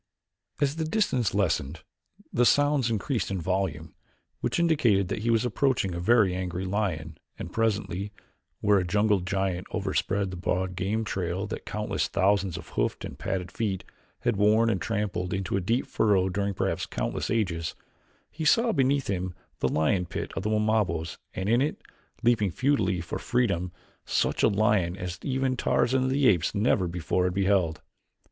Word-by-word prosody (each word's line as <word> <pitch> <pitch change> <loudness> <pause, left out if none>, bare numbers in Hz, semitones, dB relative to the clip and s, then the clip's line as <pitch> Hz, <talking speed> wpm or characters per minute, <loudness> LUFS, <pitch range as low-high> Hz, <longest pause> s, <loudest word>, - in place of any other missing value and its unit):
As 145 +1 +1
the 160 - 0
distance 155 - 0
lessened, 80 -6 0 0.5
the 120 - +3
sounds 145 -1 +3
increased 115 - -1
in 95 -1 -2
volume, 85 -3 -2 0.5
which - - -1
indicated 120 - +3
that - - -2
he 115 +2 -1
was 115 +1 +3
approaching 125 -7 +1
a 85 - -3
very 105 0 +4
angry 90 0 -3
lion 90 -6 -2 0.2
and 90 - -7
presently, 100 -3 -1 0.5
where 105 -1 +4
a - - 0
jungle 105 +2 +2
giant 95 0 -2
overspread 100 -1 -1
the 90 - -6
broad 90 +1 -1
game 100 +5 -1
trail 95 -1 -2
that 105 - -6
countless 105 0 -1
thousands 95 -2 +1
of 90 - -10
hoofed - - -1
and - - -9
padded 95 -1 -3
feet 100 -5 -2 0.4
had 120 -3 0
worn 110 +3 +4
and 95 - -1
trampled 100 -6 -2
into 95 -1 -2
a 100 - +1
deep 115 +8 0
furrow 95 -3 +2
during 100 +1 -1
perhaps - - -1
countless - - -3
ages, 90 -8 -1 0.6
he 160 - -5
saw 230 +9 +4
beneath 135 -3 +2
him 90 -2 -2 0.2
the - - +1
lion 85 +3 +1
pit - - -4
of - - -2
the 105 - -2
Wamabos 105 -6 0 0.2
and 95 - -2
in 120 +3 +3
it, 145 - -1 0.4
leaping 115 -4 +3
futilely 115 - +1
for 85 - -5
freedom 90 -8 0 0.3
such - - 0
a - - +6
lion 100 -4 +2
as 90 -1 -5
even 130 -1 0
Tarzan 130 +1 +2
of - - +1
the 135 0 +3
Apes 90 -4 +2
never 100 -3 +2
before 90 +1 -1
had 90 0 -1
beheld. 95 -5 +1
100 Hz, 170 wpm, -27 LUFS, 90-115 Hz, 0.6 s, a